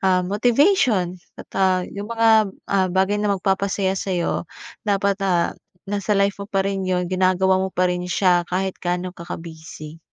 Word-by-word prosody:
ah, 185 -1 +2
motivation. 225 - +2 0.2
At, - - -11
ah, 185 -1 +2
'yung 205 +2 -7
mga, 225 -2 +4 0.2
ah, 190 -2 +1
bagay 190 +3 +1
na 205 -1 +1
magpapasaya 195 0 0
sa'yo, 180 -3 -2 0.4
dapat, 200 0 +1
ah, 180 -3 +1 0.3
nasa 205 +1 -1
life 200 0 +1
mo 200 - -7
pa 195 -3 0
rin 195 0 -1
'yun. 180 -1 +1
Ginagawa 185 0 +2
mo 190 - -1
pa 185 0 0
rin 180 0 -4
siya 175 -2 +2
kahit 190 +1 -2
gaano 180 +1 -2
ka 170 -1 -11
ka-busy. 160 -1 -9
190 Hz, 165 wpm, -22 LUFS, 180-200 Hz, 0.4 s, mga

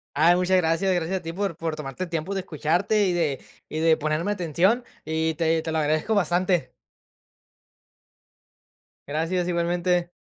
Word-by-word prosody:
Ay, 165 +4 +5
muchas 180 +1 +3
gracias. 170 +2 +1
Gracias 175 +2 -1
a - - -19
ti 165 0 -5
por 195 -2 -2
por 165 -1 -3
tomarte 150 +3 -5
el 175 - -11
tiempo 165 +4 -2
de 195 - -1
escucharte, 185 +5 +1
y 185 - +1
de 155 -6 0 0.3
y 155 - -4
de 160 0 +4
ponerme 155 +6 -1
atención. 190 - +1 0.2
Y 160 +1 -1
te 160 0 +1
te 160 - -3
lo 160 - 0
agradezco 155 +8 +1
bastante. 175 -7 +1 2.4
Gracias, 165 +5 -1
igualmente. 175 0 0
170 Hz, 160 wpm, -25 LUFS, 160-185 Hz, 2.4 s, Ay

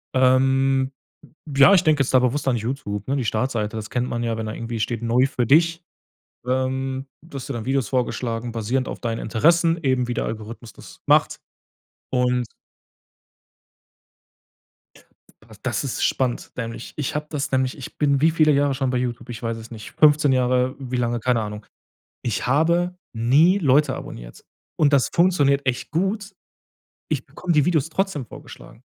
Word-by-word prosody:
Ähm. 130 +1 +3 0.6
Ja, 140 +3 +7
ich 180 - +4
denke 155 -2 +3
jetzt 135 - -1
da 130 - +8
bewusst 130 +3 0
an 130 - +3
YouTube, 110 -3 -4
ne? 135 - 0
Die 130 -4 -1
Startseite, 110 -1 -1
das 105 -2 -7
kennt 125 0 -1
man 120 0 -2
ja, 115 -1 -1
wenn 110 -1 -4
da 110 - -4
irgendwie 115 0 -5
steht: 115 +2 -2
„Neu 120 +3 +3
für 130 -4 -1
dich“, 165 +5 +3 0.6
ähm, 130 +1 -1 0.2
dass 140 -5 -8
dir 140 - -4
dann 115 -3 -5
Videos 135 -4 0
vorgeschlagen 120 -2 -2
basierend 120 +4 -1
auf - - -6
deinen 115 -1 -2
Interessen 165 +9 +2
eben, 130 -2 +1
wie 120 - -2
der - - -2
Algorithmus 110 0 -7
das - - -14
macht. - - +3 0.7
Und 125 -1 +1 2.9
P 110 0 -17
das 130 +2 -1
ist 135 - -3
spannend, 125 -2 -1
nämlich. 115 -1 -6
Ich 145 -1 -3
habe 150 0 -3
das 145 -2 -3
nämlich 130 0 0
ich 135 - -10
bin 140 -2 +2
wie 160 - +5
viele 155 -1 +4
Jahre 140 -1 +2
schon 135 -1 -1
bei 125 - 0
YouTube? 120 -1 -4
Ich 115 -2 -7
weiß 115 0 -2
es 115 +1 -11
nicht, 110 -1 -9
15 150 -2 +4
Jahre 130 0 +1
wie 130 -2 -4
lange 120 -1 0
keine 120 0 +1
Ahnung. 105 0 -6 0.6
Ich 115 -1 -2
habe 170 +6 +2 0.2
nie 140 - +4
Leute 140 -2 +3
abonniert. - - -10 0.3
Und 150 -2 +3
das 135 -2 +3
funktioniert 145 -6 +3
echt 130 -2 -2
gut. 195 +5 -1 0.8
Ich - - -2
bekomme 180 -1 -3
die 150 -3 +3
Videos 160 -3 +1
trotzdem 175 -6 -2
vorgeschlagen. - - -13
130 Hz, 170 wpm, -22 LUFS, 120-145 Hz, 2.9 s, da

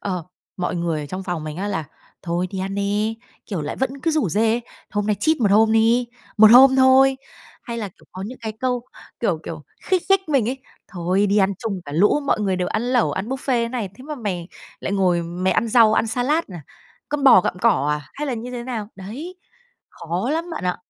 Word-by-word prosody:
ờ, 180 -4 -3 0.3
mọi 180 -1 -2
người 170 -2 -1
ở 145 - -6
trong 185 +5 -5
phòng 175 -4 -4
mình 155 0 -6
á 200 +3 -3
là 160 -6 -2 0.4
"Thôi 175 +1 -1
đi 190 - -5
ăn 190 +1 -3
đi" 205 +2 -1 0.3
kiểu, 190 -6 -3
lại 145 - -4
vẫn 265 +1 -2
cứ 325 - +1
rủ 305 - +1
rê: 220 +6 +1 0.3
"Hôm 205 0 -1
nay 210 - +2
cheat 315 0 +3
một 210 -4 +3
hôm 220 +2 +5
đi, 230 +2 +3 0.3
một 215 0 +8
hôm 265 +3 +8
thôi." 265 +1 +5 0.5
Hay 235 -2 -5
là, 210 - -4
kiểu, 180 - -23
có 185 - -7
những 255 +4 -9
cái 220 -2 -4
câu, 250 -2 0 0.4
kiểu, 190 -9 0
kiểu, 160 -2 -7 0.2
khích 370 -2 +1
khích 385 -3 +3
mình 265 -7 +2
ấy: 260 +2 -3 0.3
"Thôi 185 +2 0
đi 200 +1 +1
ăn 195 0 +3
chung 205 -5 -4
cả 145 - -8
lũ, 205 - +3
mọi 220 - +1
người 195 -3 0
đều 180 -1 -1
ăn 215 - -1
lẩu, 245 0 +1
ăn 190 +4 -4
buffet 265 - -2 0.3
thế - - -3
này. 235 -5 -3
Thế 255 - -13
mà 300 +1 -5
mày 190 -9 -4 0.3
lại - - -3
ngồi 180 -3 +2
mày 175 +3 -1
ăn 230 - +1
rau, 225 -1 +5
ăn 225 - +2
salad 255 +8 0
à, 175 -5 -9 0.5
con 290 -1 -2
bò 260 -8 +8
gặm 180 - -3
cỏ 180 - +2
à, 150 0 -1
hay 295 +2 -4
là 260 - -1
như 235 +2 -6
thế 245 -1 -5
nào?" 235 -4 -5
Đấy, 255 - -8 0.5
khó 175 - -3
lắm 330 +3 -2
bạn 320 - -5
ạ. 180 0 0
215 Hz, 235 wpm, -22 LUFS, 185-255 Hz, 0.5 s, một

